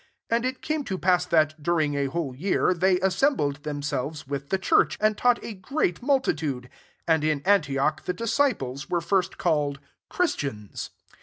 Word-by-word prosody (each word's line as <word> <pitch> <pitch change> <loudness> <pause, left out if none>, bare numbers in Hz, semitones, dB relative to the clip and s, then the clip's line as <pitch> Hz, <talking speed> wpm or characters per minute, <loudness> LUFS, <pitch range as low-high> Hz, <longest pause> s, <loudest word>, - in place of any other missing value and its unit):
26 230 - +3
And 235 +1 0
it - - -37
came 310 -1 -1
to 190 -4 -3
pass 180 -1 +2
that, 155 -2 +2
during 155 -2 +1
a 140 -1 0
whole 145 -3 -3
year, 185 +4 +1
they 180 +1 +2
assembled 190 - +1
themselves 145 0 -3
with 140 0 -5
the 190 - +2
church; 190 - +2
and 215 0 +2
taught 245 +2 +3
a 225 - -5
great 190 - -1
multitude; 155 - 0 0.4
and 160 -2 +3
in 155 -2 0
Antioch 150 -7 +2
the 180 - -1
disciples 230 - -1
were 175 - +1
first 190 +1 0
called 150 -5 0 0.3
Chris 360 -4 +1
tians. 105 -8 -5
170 Hz, 170 wpm, -26 LUFS, 145-200 Hz, 0.4 s, 26